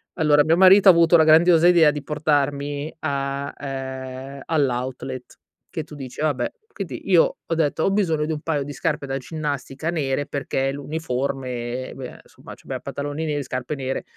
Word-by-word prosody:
Allora, 150 -3 +4
mio 160 +2 +3
marito 190 +2 +8
ha - - +12
avuto 170 0 +5
la 160 - +7
grandiosa 165 +2 +6
idea 170 -4 +6
di 145 -1 -6
portarmi 145 0 -1
a 140 0 -3
ehm, 135 0 -6
all'outlet, 130 -3 -2 0.3
che 160 -4 -4
tu 150 - -12
dici: 130 -3 -9
"Vabbè." 150 -4 0 0.2
Quindi, - - -6
io - - +4
ho 165 - -1
detto: 160 0 0
"Ho - - +2
bisogno 165 -7 +1
di 160 - -2
un 150 - -5
paio 150 -3 -1
di 145 +1 -7
scarpe 150 +1 -2
da 135 0 -3
ginnastica 145 +1 -4
nere." 145 -4 -1
Perché 135 -1 -2
l'uniforme, 130 -4 -4
beh, 130 -2 -8
insomma, - - -13
c'abbiam - - -7
pantaloni 145 +2 -4
neri, 145 -2 -2
scarpe 130 +2 -4
nere. 135 -1 -3
145 Hz, 170 wpm, -23 LUFS, 135-160 Hz, 0.3 s, ha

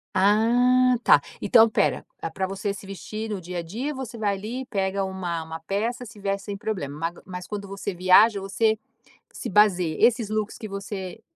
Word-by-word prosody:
Ah, 245 +6 +4
tá. - - +6 0.2
Então 230 -2 +6
espera, 220 - +1 0.2
eh, - - -4
pra 190 -1 -2
você 195 +1 -3
se 200 0 -10
vestir 215 +3 -6
no 205 -2 -3
dia 180 0 -5
a - - -2
dia, 230 - -4
você 260 -4 -7
vai 205 -2 0
ali, 230 +7 -5
pega 195 -3 -1
uma 180 -3 -3
uma 160 0 -7
peça, 215 +9 -2
se 230 -3 -12
veste 195 0 -2
sem 205 -1 -5
problema. 165 -6 -3
Mas 180 -1 -7
q - - -19
quando 205 -1 -5
você 195 0 -4
viaja, 190 +4 +5
você 215 +3 +1 0.5
se - - -6
basei 185 -6 +3
esses 230 -3 +3
looks 215 -1 -2
que 215 - -7
você 195 0 -6
200 Hz, 190 wpm, -25 LUFS, 190-220 Hz, 0.5 s, tá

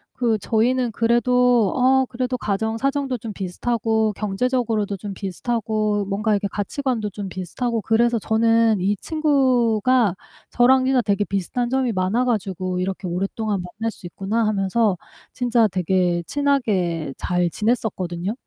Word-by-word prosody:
그 230 -3 +1
저희는 240 +3 +1
그래도 240 -1 +3
어 265 +1 +4
그래도 255 +1 -2
가정 220 0 -2
사정도 275 0 -1
좀 220 -1 -7
비슷하고 220 +3 -1
경제적으로도 215 0 -1
좀 200 +1 -6
비슷하고 210 +1 -2
뭔가 205 +3 -1
이렇게 200 0 0
가치관도 220 +2 -2
좀 200 0 -6
비슷하고 225 +6 -3
그래서 230 +2 +2
저는 225 0 +2
이 195 +3 +1
친구가 255 - +2 0.4
저랑 260 +2 +4
진짜 260 -1 +3
되게 205 -2 0
비슷한 200 +6 -2
점이 260 -1 +1
많아 190 +6 +1
가지고 185 -6 -2
'이렇게 190 +1 -3
오랫동안 195 +3 -2
만날 215 +6 -4
수 190 - -13
있구나.' 205 +6 -1
하면서 205 0 +1 0.4
진짜 240 -3 +2
되게 180 -2 0
친하게 195 - 0
잘 180 -1 0
지냈었거든요. 195 -4 -2
220 Hz, 330 characters per minute, -22 LUFS, 195-245 Hz, 0.4 s, 어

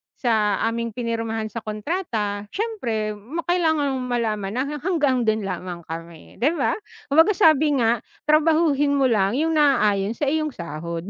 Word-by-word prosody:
sa 215 -4 +1
aming 230 -1 -2
pinirmahan 225 -2 -3
sa 230 - -4
kontrata, 215 - -3
siyempre 240 - -2
ma 260 +12 -6
kailangan 320 -5 +2
malaman 225 -5 -2
na 255 - +1
ha 290 +2 -4
hanggang 280 -8 +1
dun 220 -1 +1
lamang 180 -2 -5
kami, 165 +1 -9
'di 295 +9 +2
ba?" - - +1 0.4
Kumbaga, 325 +7 +5
sabi 310 -2 +4
nga, 230 0 +2 0.2
"Trabahuhin 305 -2 +3
mo 265 -3 +3
lang 200 +1 +2
yung 320 +3 +1
naaayon 215 -7 +2
sa 295 - -5
iyong 310 -3 -1
sahod." 170 0 -5
235 Hz, 150 wpm, -23 LUFS, 210-300 Hz, 0.4 s, Kumbaga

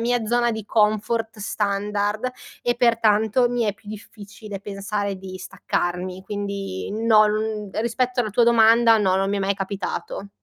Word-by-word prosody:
mia 240 0 0
zona 240 +1 +2
di 220 -2 -5
comfort 215 +1 0
standard, 205 +3 -1 0.3
e 240 0 +1
pertanto 230 0 +3
mi 245 0 -1
è 210 - 0
più 210 0 -18
difficile 210 -1 -9
pensare 200 0 -3
di 185 0 -8
staccarmi. 185 -1 -3
Quindi 200 - -4
no, 215 -1 +4
mhmm, 215 -1 -2
rispetto 245 +2 -1
alla 215 -3 -2
tua 235 +3 +3
domanda 230 0 +5 0.2
no, 190 -3 +2
non 195 +1 +1
mi 205 - 0
è - - -2
mai 195 +1 0
capitato. 195 0 -5
210 Hz, 155 wpm, -23 LUFS, 200-230 Hz, 0.3 s, domanda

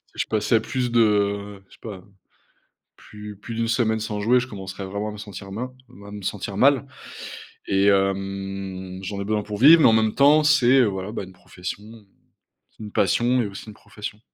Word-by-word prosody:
je - - -1
passais 110 +1 +1
plus 125 +2 -2
de 100 -3 +1
je - - -19
sais - - -17
pas, 100 -5 -8 0.9
plus 105 0 -11
plus 115 +3 -8
d'une 115 0 -1
semaine 115 -2 +1
sans 105 -1 -4
jouer, 120 +4 +4
je 120 - -4
commencerais 95 -3 -7
vraiment 100 +3 -4
à - - -6
me 105 - -9
sentir 100 -1 -9
main 125 +5 -5 0.2
m 100 - -15
à 100 - -10
me 105 0 -8
sentir 100 +1 -4
mal 140 +5 +3 0.8
et 95 0 +2
hem, 95 -1 -1
j'en 100 +1 -5
ai - - -3
besoin 105 0 -1
pour 105 -1 -6
vivre 155 +6 +8
mais - - +7
en - - +5
même 110 -1 +2
temps, 150 +2 +5
c'est, 135 -4 +5
heu, - - +3
voilà, 95 -1 -3
bah, 105 - -5
une 95 - -13
profession, 90 +2 -8 0.9
c'est - - -13
une 105 - -8
passion 120 +7 +2
et 110 - -2
aussi 100 0 -9
une 110 - -9
profession. 105 +1 -9
105 Hz, 205 wpm, -23 LUFS, 100-115 Hz, 0.9 s, vivre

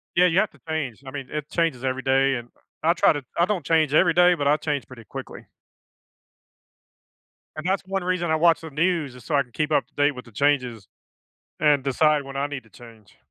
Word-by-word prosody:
Yeah, 180 +1 +5
you 180 +1 +3
have 215 - +1
to - - -22
change, 140 -7 -4
I - - -6
mean, 135 -2 -6
it 150 -1 -5
changes 165 -7 -1
every 130 0 -1
day, 135 +1 +2
and 120 -1 -7 0.3
I 165 +2 +4
try 170 - +4
to 145 -2 -5
I 170 - +4
don't 185 -7 -2
change 155 -2 +2
every 170 +2 +4
day, 180 +1 +5
but 145 -5 -1
I 150 +1 +4
change 145 -3 -3
pretty 120 -4 -13
quickly. - - -9 2.1
And 155 +1 -7
that's 190 +1 0
one 195 -1 -2
reason 180 -2 -1
I - - +3
watch 165 +1 +3
the 160 - -8
news 155 -3 0
is 125 - -14
so 155 - -1
I 140 - +4
can 125 - -26
keep 155 +5 -2
up - - +2
to - - -38
date 145 0 +3
with 125 -2 -9
the 120 - -16
changes 125 -4 0 0.7
and 150 -3 +3
decide 150 +2 +2
when 135 0 -8
I 140 +1 0
need 145 -3 -6
to 110 - -22
change. 110 -3 -16
145 Hz, 230 wpm, -24 LUFS, 130-165 Hz, 2.1 s, Yeah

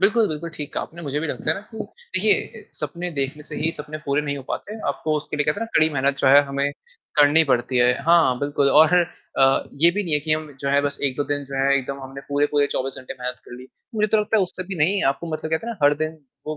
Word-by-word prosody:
बिल्कुल, 215 +3 +4
बिल्कुल, 155 +2 -5
ठीक 145 -1 -6
कहा - - -1
आपने, 170 +1 -10
मुझे 145 -1 -2
भी 165 - -2
लगता - - -3
है - - +2
ना 195 - -6
कि 220 - -8 0.4
देखिए, - - 0
सपने 175 0 -4
देखने 140 0 -3
से - - -8
ही 160 - 0
सपने 150 +1 -7
पूरे 140 +1 +1
नहीं 145 -1 -3
हो 140 - -7
पाते, 215 +2 -5
आपको 155 -1 -1
उसके 150 0 -4
लिए 150 - +1
क्या 150 - +2
कहते - - -7
हैं - - -2
ना, 225 - +1
कड़ी 155 - +5
मेहनत 140 0 +1
जो - - +1
है 140 +2 +8
हमें 140 +1 -1 0.5
करनी 150 +3 +6
पड़ती 125 -1 +1
है 125 0 +5
हाँ, 160 -5 +4
बिल्कुल 145 -1 +1
और 155 +4 +6 0.4
अ, 135 0 +4 0.2
ये 170 +2 +7
भी 205 +3 -1
नहीं 170 -5 -3
है 150 - +3
कि 155 +1 -1
हम 155 -1 -2
जो 140 - -2
है 140 +1 +4
बस 145 0 -2
1-2 140 +1 0
दिन 145 -1 -1
जो 135 0 -9
है 135 +1 +3
एकदम 135 +1 -3
हमने 135 +1 -8
पूरे-पूरे 145 0 +2
24 135 +1 -2
घंटे 130 - -8
मेहनत 125 0 -4
कर - - -13
ली। 125 +1 -11 0.3
मुझे 215 0 +2
तो - - +6
लगता 210 +1 +1
है 205 - +4
उससे 185 0 -4
भी 195 - -3
नहीं 185 +6 +2
आपको 140 +5 -2
मतलब 155 0 -4
कहते 160 +8 -1
हैं 235 - -2
ना - - -22
हर 145 +1 +6
दिन, 155 +1 -3 0.3
वो 155 0 -3
150 Hz, 275 wpm, -23 LUFS, 140-165 Hz, 0.5 s, है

